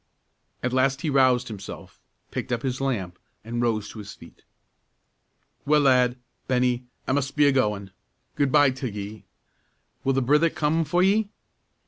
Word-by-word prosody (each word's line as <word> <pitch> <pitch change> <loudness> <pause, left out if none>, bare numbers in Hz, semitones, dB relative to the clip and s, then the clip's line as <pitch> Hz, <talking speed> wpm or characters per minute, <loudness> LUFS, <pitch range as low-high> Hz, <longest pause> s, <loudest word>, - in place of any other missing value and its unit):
At 125 0 -1
last 135 +2 +2
he 155 - -1
roused 130 -2 +3
himself, 100 -4 -9 0.3
picked - - -4
up 120 -2 -1
his 130 0 -2
lamp, 100 -10 -2 0.2
and 120 +2 -3
rose 110 -3 0
to 110 - -10
his 100 -1 -8
feet. - - -16 1.2
"Well, 150 +1 +3
lad, 125 -2 +3 0.3
Bennie, 125 -1 +1 0.2
I - - 0
mus' 140 0 +1
be 145 +1 +2
a 140 - +5
goin'; 105 -7 0 0.4
good 140 -2 +1
by 145 -2 +5
till 130 -1 -4
ye. 105 +1 -7 0.8
Will 135 - +2
the 135 - +1
brither 150 +6 +4
come 160 +2 0
for 175 +5 +2
ye?" 205 +2 +2
130 Hz, 160 wpm, -25 LUFS, 120-145 Hz, 1.2 s, a